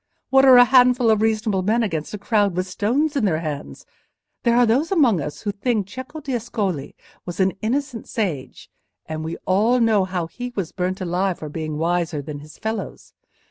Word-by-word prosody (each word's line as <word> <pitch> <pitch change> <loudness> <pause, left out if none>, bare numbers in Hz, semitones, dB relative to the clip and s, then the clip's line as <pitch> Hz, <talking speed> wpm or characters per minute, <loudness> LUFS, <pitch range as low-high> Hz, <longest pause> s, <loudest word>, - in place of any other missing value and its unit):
What 270 0 +6
are 260 -2 +8
a 245 - +9
handful 250 -2 +5
of 215 -1 +2
reasonable 215 -3 +1
men 220 +5 +1
against 165 -8 -3
a - - -5
crowd 205 -2 +1
with 185 0 -1
stones 250 +11 0
in 275 - +1
their 165 -6 +1
hands? 150 -3 -6 0.6
There 235 -1 +2
are 245 - +6
those 260 - +1
among 255 - +3
us 150 +1 -6
who 205 - -2
think 210 0 -1
Cecco 260 +9 -8
d'Ascoli 220 - -3 0.3
was 175 0 -7
an 190 0 +2
innocent 245 +1 -2
sage—and 155 - -6
we 160 +1 -4
all 220 +7 +3
know 220 -4 +3
how 180 -2 -3
he 245 +9 -7
was 185 -6 -3
burnt 185 +1 -3
alive 185 +1 -1
for 155 - -7
being 155 0 -4
wiser 170 -1 0
than 145 0 -6
his 150 +1 -13
fellows. 220 0 -5
205 Hz, 185 wpm, -22 LUFS, 170-240 Hz, 0.6 s, a